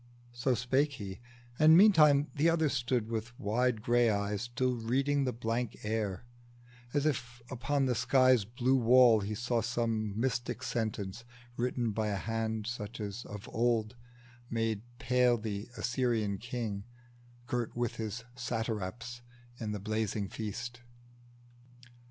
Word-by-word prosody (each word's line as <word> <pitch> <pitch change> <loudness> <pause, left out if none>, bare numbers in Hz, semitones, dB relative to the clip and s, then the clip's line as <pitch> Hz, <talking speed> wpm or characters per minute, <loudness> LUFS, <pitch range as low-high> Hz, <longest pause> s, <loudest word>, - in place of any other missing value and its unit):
So 120 +2 0
spake 135 +5 +1
he, 100 -7 -7 0.4
and 155 +1 +8
meantime 155 -8 +6
the 155 +2 +3
other 160 -2 +2
stood 125 -4 0
With 115 +1 -4
wide 115 +1 0
gray 120 0 +4
eyes 100 -1 -1
still 125 +2 0
reading 135 +4 +1
the 130 - 0
blank 115 0 -2
air, 105 -1 -2 0.7
As 145 +1 0
if 120 -5 -2
upon 135 +3 0
the 125 - +2
sky's 130 -1 +4
blue 120 +5 +1
wall 120 -1 +6
he 105 +1 -3
saw 120 +1 0
Some 110 -2 -1
mystic 120 -1 -1
sentence, 110 -2 -3 0.3
written 120 -1 -1
by 110 +1 -1
a 105 - -1
hand 110 +1 -2
Such 115 -1 -5
as 105 +2 -5
of 105 -1 -8
old 115 -1 +1 0.5
made 115 -2 -1 0.2
pale 125 0 +3
the 105 -2 -4
Assyrian 115 -5 0
king, 110 -4 -4 0.6
Girt 120 -1 -2
with 120 -1 -2
his 110 +1 -4
satraps 120 -1 -4 0.4
in 110 -2 -3
the 105 - -3
blazing 105 -1 -2
feast. 115 +3 -5
120 Hz, 135 wpm, -32 LUFS, 110-125 Hz, 0.7 s, and